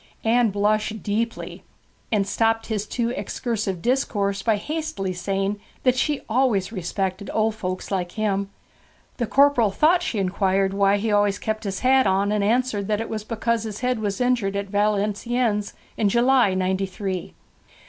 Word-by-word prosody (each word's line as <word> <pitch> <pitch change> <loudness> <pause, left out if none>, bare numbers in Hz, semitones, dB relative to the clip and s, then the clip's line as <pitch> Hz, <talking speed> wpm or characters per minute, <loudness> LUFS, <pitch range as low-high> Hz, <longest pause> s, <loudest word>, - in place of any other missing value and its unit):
Anne 230 +1 +3
blushed 210 +1 0
deeply, 225 +3 -3 0.5
and 205 -3 +2
stopped 225 +2 +1
his 215 -2 -3
too 235 -1 -1
excursive 215 -8 -3
discourse 205 -6 0
by 220 +1 +2
hastily 300 - -3
saying 195 +2 -2 0.2
that 255 -1 +4
she 290 +2 0
always 225 -5 +1
respected 190 0 -3
old 220 0 +2
folks 185 -3 -5
like 180 -2 -2
him. 200 -2 -1 0.7
The 235 - -1
corporal 275 -5 +4
thought 320 - +3
she 250 - -2
inquired 195 0 +1
why 200 0 +3
he 215 +2 -1
always 205 -1 +3
kept 220 +1 -3
his 195 -1 -3
hat 260 +1 +4
on, 195 +2 +2
and 210 -1 +1
answered 220 -2 +1
that 210 -1 0
it 225 - -4
was 215 -1 -4
because 230 +1 -1
his 215 0 -6
head 250 -2 0
was 205 -2 -2
injured 245 -6 +1
at 200 -1 -3
Valenciennes, 210 +2 0 0.2
in 210 -3 +2
July, 240 -3 +3
Ninety 190 +1 0
three. 190 -1 -5
210 Hz, 160 wpm, -23 LUFS, 195-235 Hz, 0.7 s, that